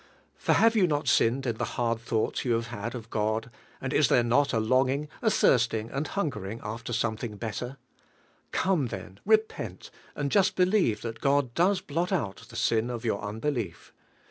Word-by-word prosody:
For - - +1
have 225 0 +4
yon 195 -5 +4
not 145 -2 -1
sinned 130 +4 +3
in 115 -3 -1
f - - -19
lie - - -1 0.3
,;inl 115 - -7
ilnuigliis 115 -1 -1
you 120 - +1
have 115 0 -1
had 115 +1 -5
of 115 -2 -8
Bod, 110 +2 -1 0.3
and - - -3
is - - +4
there 120 - +4
not 130 +5 +3
a 115 - +1
longing, 130 +5 +2
a 230 - +3
thirsting 115 - +2
anil 140 +4 -2
hungering 115 - -3
ufler 110 +2 -6
snniollling 115 -2 -2
liiiler? 120 +4 -4 0.8
dome, 180 -9 +1
[hen, 95 -3 -8
repent, 215 - 0 0.2
and 140 -1 -2
just 200 -2 +3
believe 180 - +2
thai 115 - -3
God 140 -3 +2
does 185 +5 +2
hi. 145 - -10
'I 185 +2 +1
mil 95 -3 -6 0.2
the 115 - -12
sin 115 +1 +1
of 120 -1 -5
your 110 -3 0
unbelief. 110 - -4
120 Hz, 190 wpm, -28 LUFS, 110-145 Hz, 0.8 s, have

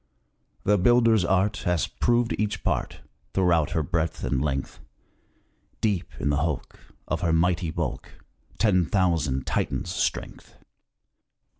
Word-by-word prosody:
"The 105 0 +3
builder's 115 0 +4
art 95 +4 +1
Has 90 -2 0
proved 120 -1 +1
each 105 -1 -1
part - - -2 0.3
Throughout 85 -5 +2
her 80 - +1
breadth 80 0 -2
and 65 -2 0
length; 70 -2 -2 1.0
Deep 100 -6 -1
in 70 - 0
the 70 - +2
hulk, 75 0 -3 0.3
Of - - -2
her 85 - +1
mighty 85 +1 +2
bulk, 80 -4 -4 0.5
Ten 90 -6 +3
thousand 80 -9 +1
Titans' - - -2
strength." - - -3
90 Hz, 125 wpm, -25 LUFS, 80-100 Hz, 1.0 s, builder's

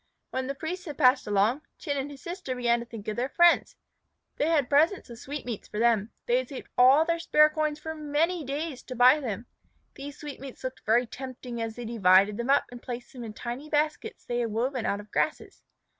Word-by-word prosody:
When 260 0 -2
the 275 - -3
priests 360 +5 -5
had 295 -5 -7
passed 255 -2 +4
along, 210 +7 +2 0.2
Chin 285 -4 -3
and 275 +1 -3
his 280 -2 -12
sister 345 -7 -5
began 240 -1 +2
to 235 - -8
think 225 -3 -9
of 215 - -2
their 250 +3 -1
friends. 345 +2 +4 0.6
They 295 - +1
had 305 -6 +2
presents 310 +2 +2
of 230 - -10
sweetmeats 255 -5 -6
for - - -7
them. 225 -2 +2 0.2
They 240 - +3
had 255 - -5
saved 270 - -8
all 265 +5 +6
their 335 0 0
spare 305 -2 +5
coins 305 -1 -1
for 320 +1 -6
many 310 +3 0
days 285 0 -4
to 255 - -7
buy 250 +5 +6
them. 235 -4 -4 0.5
These 285 +1 -9
sweetmeats 275 -4 -9
looked 260 0 -5
very 235 +3 +4
tempting 250 -1 -7
as 225 -1 -4
they 245 - -7
divided 200 -2 +4
them 235 +2 -3
up 280 +1 +4
and 245 -1 -10
placed 245 +3 -7
them 250 -2 -8
in 220 -2 -7
tiny 250 +7 -6
baskets 305 +1 -1
they 240 0 -2
had 235 -1 0
woven 245 +3 -1
out 200 - 0
of 205 0 -12
grasses. 310 - -2
260 Hz, 220 wpm, -27 LUFS, 235-300 Hz, 0.6 s, all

